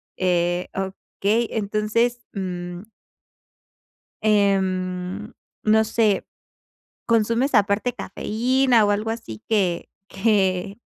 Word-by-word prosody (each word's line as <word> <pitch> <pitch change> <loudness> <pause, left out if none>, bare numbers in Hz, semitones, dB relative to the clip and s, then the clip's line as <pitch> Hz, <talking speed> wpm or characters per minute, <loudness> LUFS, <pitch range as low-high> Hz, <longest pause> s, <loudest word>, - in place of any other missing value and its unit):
Eh, 175 -1 +1
okey, 200 +4 -1
entonces, 220 +3 0
mm 180 -2 -5 1.4
em, 190 -1 0 0.3
no 220 +1 +4
sé. 220 -2 +1 0.8
¿Consumes 230 +4 +2
aparte 205 +3 +3
cafeína, 240 +3 +1
o 205 - +2
algo 210 +2 -1
así 170 - -6
que, 190 -6 +1 0.2
que 195 -1 +1
205 Hz, 80 wpm, -23 LUFS, 185-225 Hz, 1.4 s, no